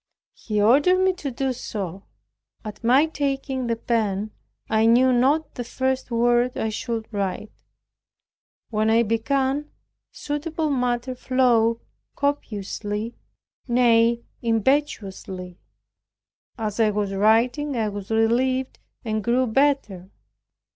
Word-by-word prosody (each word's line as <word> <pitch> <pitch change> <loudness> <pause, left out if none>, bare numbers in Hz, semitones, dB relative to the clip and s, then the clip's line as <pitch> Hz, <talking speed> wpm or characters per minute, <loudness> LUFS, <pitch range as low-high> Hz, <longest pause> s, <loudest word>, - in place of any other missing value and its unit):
He 210 -2 -3
ordered 280 - +5
me 375 0 +3
to 310 -6 -5
do 265 +1 -2
so. 195 -5 -6 0.6
At 215 +1 -8
my 260 +6 +5
taking 275 -4 -2
the 230 - 0
pen 215 -3 -1 0.4
I 220 0 +2
knew 250 +3 +5
not 285 +5 +2
the 245 - -5
first 260 +2 -2
word 240 +1 +2
I 220 - -1
should 225 +1 -3
write; 200 +1 -3 1.2
when 215 0 +1
I 230 +1 +4
began, 265 +6 0 0.4
suitable 310 +1 -3
matter 250 -1 -1
flowed 245 -3 +2 0.3
copiously, 215 -5 -3 0.5
nay, 235 -1 +3 0.2
impetuously. 205 -7 -1 1.0
As 215 -2 -4
I 220 -1 +4
was 205 -1 -2
writing 240 +8 +2
I 220 -2 0
was 200 -1 -7
relieved 250 +4 +1 0.3
and 215 -1 -2
grew 245 +3 +2
better. 230 -7 0
235 Hz, 115 wpm, -23 LUFS, 215-265 Hz, 1.2 s, ordered